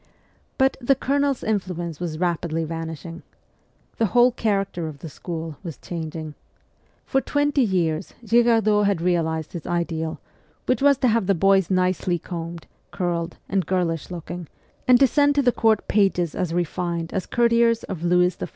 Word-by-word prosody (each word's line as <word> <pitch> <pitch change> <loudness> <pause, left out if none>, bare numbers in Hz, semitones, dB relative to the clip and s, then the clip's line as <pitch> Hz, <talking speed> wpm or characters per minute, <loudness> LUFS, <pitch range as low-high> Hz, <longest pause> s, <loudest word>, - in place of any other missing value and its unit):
But 265 0 +2
the 270 +3 +3
Colonel's 280 0 0
influence 180 -6 -2
was 170 -3 -4
rapidly 170 -1 -1
vanishing. 165 +1 -6 0.8
The 225 - +2
whole 245 +5 +5
character 195 -7 -1
of 155 -2 -7
the 160 +3 -8
school 160 -1 -6
was 165 -6 -7
changing. 160 -2 -6 0.7
For 270 - +1
twenty 290 0 +1
years 175 -8 0
Girardot 225 -3 +4
had 200 -4 +1
realized 160 -2 -1
his 170 - -6
ideal, 165 -2 -2 0.5
which 255 -3 +1
w 280 - +4
r - - +8
as 280 - +3
to 255 - +4
have 225 -4 +2
the 195 - +3
boys 195 +1 +3
nicely 185 -1 +1
combed, 170 0 -7 0.2
curled, 175 -2 -2
and 190 -2 -1
girlish 175 -4 -1
looking, 175 -1 -7 0.4
and 250 -1 +7
to 275 - +7
send 285 +3 +3
to 285 - +3
the 245 - +4
court 220 -3 +2
pages 190 -5 +2
as 180 -5 -2
refined 170 -1 -2
as 190 - -2
courtiers 235 -1 +3
of 185 -5 -6
Louis 180 0 +3
XIV. - - -6
180 Hz, 165 wpm, -23 LUFS, 165-225 Hz, 0.8 s, r